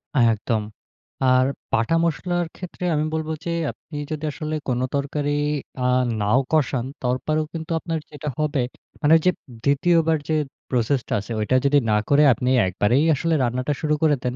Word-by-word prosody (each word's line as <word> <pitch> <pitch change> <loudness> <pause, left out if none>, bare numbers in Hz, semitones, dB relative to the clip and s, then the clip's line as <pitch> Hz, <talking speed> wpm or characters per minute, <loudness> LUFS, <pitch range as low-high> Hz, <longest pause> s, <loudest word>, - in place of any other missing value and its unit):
আ 135 - +4
একদম। 110 0 -1 0.6
আর 130 0 +5 0.3
বাটা 115 +9 +2
মসলার 175 +4 -1
ক্ষেত্রে 180 -1 -8
আমি 150 +1 +1
বলব 160 0 -2 0.2
যে - - -2 0.2
আপনি 150 - -11
যদি 155 0 -4
আসলে 155 +1 -4
কোন 125 -2 0 0.2
তরকারি, 145 +1 -1 0.5
আ - - 0 0.4
নাও 105 +6 +3
কষান, 135 -5 +1 0.2
তারপরও 155 +5 0
কিন্তু 165 0 -6
আপনার 165 -1 -3
যেটা 150 0 -5
হবে, 150 -3 +1 0.4
মানে 155 +1 +6
যে - - +6 0.3
২য় 165 +5 +3
বার 160 - +3
যে 155 - +2 0.3
প্রসেস 125 +2 +1
টা - - -2
আছে 105 +4 -8
ঐটা 120 +4 +1
যদি 140 +1 +4
না 105 - +4
করে 145 +1 +5
আপনি 125 +3 -2 0.2
একবারেই 105 +9 +2
আসলে 165 +4 0
রান্নাটা 125 +4 0
শুরু 150 -1 +1
করে 150 -2 +4
দেন, 125 0 -1
145 Hz, 170 wpm, -23 LUFS, 125-155 Hz, 0.6 s, মানে